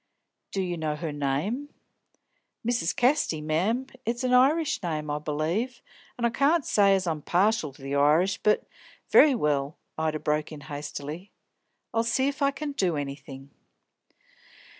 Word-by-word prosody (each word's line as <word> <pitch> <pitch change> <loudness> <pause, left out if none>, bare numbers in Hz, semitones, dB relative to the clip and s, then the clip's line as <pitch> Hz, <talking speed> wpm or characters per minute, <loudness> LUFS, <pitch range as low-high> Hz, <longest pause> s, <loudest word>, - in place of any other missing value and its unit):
"Do 195 - -1
you 175 -1 -3
know 155 -2 -2
her 160 0 -4
name?" 145 - -2 1.0
"Mrs. 235 -8 0
Casty, 245 - +2
mem. 180 +12 0 0.2
It's 235 +3 -2
a 255 - +1
Irish 280 +5 +3
name, 155 -4 -3
I 150 - -1
b'lieve, 165 - -2 0.3
an' 240 - 0
I 235 - +2
can't 285 +5 +2
say 200 -2 +4
as 190 -1 -1
I'm 160 -3 -2
partial 185 0 +1
to 135 - -16
the 135 +1 -4
Irish, 155 +7 +3
but 210 - +2 0.2
" - - -26
"Very 290 -3 +7
well," 145 - 0 0.2
Ida 155 -1 0
broke 150 0 -1
in 150 -2 -8
hastily. 145 +4 -7 0.6
"I'll 225 - +2
see 260 +3 +1
if 280 +1 -3
I 280 - +4
can 290 +1 -4
do 185 - 0
anything." 140 -1 -7
175 Hz, 160 wpm, -27 LUFS, 150-240 Hz, 1.0 s, Very